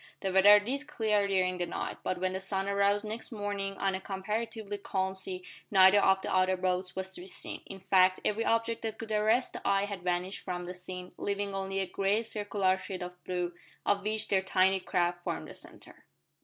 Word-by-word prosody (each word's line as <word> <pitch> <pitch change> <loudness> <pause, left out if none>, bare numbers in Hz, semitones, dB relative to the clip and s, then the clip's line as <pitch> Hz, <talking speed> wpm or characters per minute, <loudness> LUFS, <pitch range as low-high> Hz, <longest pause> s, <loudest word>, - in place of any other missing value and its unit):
The 190 -2 -1
weather 205 +2 +8
did 275 +8 -3
clear 210 -6 +1
during 185 -2 +1
the 175 - -1
night, - - -4
but 185 - -2
when 185 +1 -1
the 190 - -2
sun 195 0 -2
arose 200 +1 +2
next 220 +4 -6
morning 200 -2 -3
on 195 -1 0
a 190 - -3
comparatively 210 +2 -4
calm 190 -1 -1
sea 190 -1 -6 0.3
neither 190 0 +7
of 190 -1 +3
the - - -2
other 185 0 +3
boats 180 0 -1
was 190 0 -3
to 190 - -8
be 185 - -10
seen. - - -4
In 195 -1 -9
fact 185 -1 +4
every 215 +2 +1
object 230 0 +1
that 220 -1 -4
could 225 -1 -7
arrest 215 +4 +2
the - - -6
eye 200 0 +2
had 200 -3 -6
vanished 180 +2 -1
from 180 -1 -4
the 180 - -5
scene, 180 0 -8
leaving 200 0 -2
only 195 0 -2
a - - 0
great 200 +4 0
circular 205 -3 0
shield 185 -1 -5
of 180 0 -9
blue, 180 -1 -2 0.3
of 200 0 +2
which 215 +1 -1
their 190 -1 +3
tiny 190 0 +3
craft 175 -1 0
formed - - -3
the - - -9
centre. - - -12
195 Hz, 210 wpm, -30 LUFS, 185-205 Hz, 0.3 s, weather